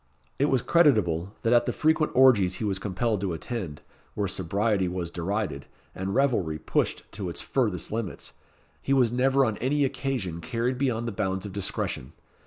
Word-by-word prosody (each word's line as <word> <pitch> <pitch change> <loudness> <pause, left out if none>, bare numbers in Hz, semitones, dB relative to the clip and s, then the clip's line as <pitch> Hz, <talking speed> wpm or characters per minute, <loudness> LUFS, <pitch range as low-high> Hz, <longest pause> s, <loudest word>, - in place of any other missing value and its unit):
It 140 - +4
was 135 -4 +1
creditable, 105 - +3
that 115 - +3
at 120 0 +4
the - - +2
frequent 155 0 +2
orgies 110 -9 +5
he - - -4
was 100 -2 0
compelled 105 +2 -1
to 95 -3 -1
attend, 85 -4 -5 0.3
where 100 -1 0
sobriety 95 +2 0
was 90 -1 -3
derided, 85 -5 -3 0.3
and 95 +1 -3
revelry 110 - +1
pushed - - -1
to 95 -3 -5
its 85 - -5
furthest 110 -10 -1
limits, 110 -4 -4 0.5
he 135 - 0
was 125 -4 +4
never 135 +2 +3
on 110 -3 -1
any 140 +3 +1
occasion 125 - -3
carried 125 +3 -2
beyond 120 -4 0
the - - -2
bounds 95 -1 -2
of 100 - -7
discretion. 95 -9 -2
105 Hz, 175 wpm, -27 LUFS, 95-125 Hz, 0.5 s, orgies